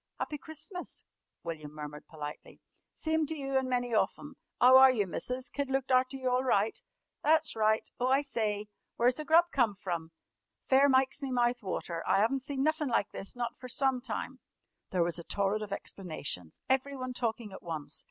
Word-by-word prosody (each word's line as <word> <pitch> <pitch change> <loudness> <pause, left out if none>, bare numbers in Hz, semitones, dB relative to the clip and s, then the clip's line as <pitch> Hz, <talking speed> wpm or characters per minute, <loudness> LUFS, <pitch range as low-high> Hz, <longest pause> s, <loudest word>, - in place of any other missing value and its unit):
"Happy 300 - -3
Christmas," 315 +5 -7 0.4
William 155 -3 -6
murmured 150 -1 -8
politely. 150 -2 -8 0.3
"Sime 315 -1 0
to 320 - -2
you 275 -2 -3
an' 265 -1 +2
many 245 -1 0
of 215 - +3
them. 290 -2 -11 0.2
'Ow 255 +1 +8
are 265 0 +10
you, 225 -6 +2
Missus? 250 - -3
Kid 280 -1 -2
looked 270 -1 0
arter 255 +1 +3
you 260 -1 -3
all 250 +1 +2
right? 220 -4 +1 0.4
That's 315 -2 +3
right. 220 0 +2
Oh, 250 - +1
I 270 +2 +3
sye! 215 -6 -1 0.3
Where's 245 +1 +3
the 305 - -5
grub 330 +3 +6
come 235 -6 +2
from? 170 -4 -4 0.6
Fair 275 +2 +6
mikes 260 +1 +3
me 275 - -3
mouth 245 -1 +1
water. 175 -4 -3
I - - +4
'aven't 270 +4 +1
seen 270 0 -2
nuffin' 310 -1 +1
like 215 -4 +1
this 195 - -6
not 240 -1 -4
fer 255 - -8
some 260 0 +1
time!" 255 +2 -5 0.5
There 180 -2 +2
was 170 0 -2
a - - -7
torrent 200 +4 0
of 210 -2 -6
explanations, 155 - -5
everyone 265 -1 0
talking 230 -4 -2
at - - -9
once. 155 -3 -5
250 Hz, 190 wpm, -31 LUFS, 200-270 Hz, 0.6 s, are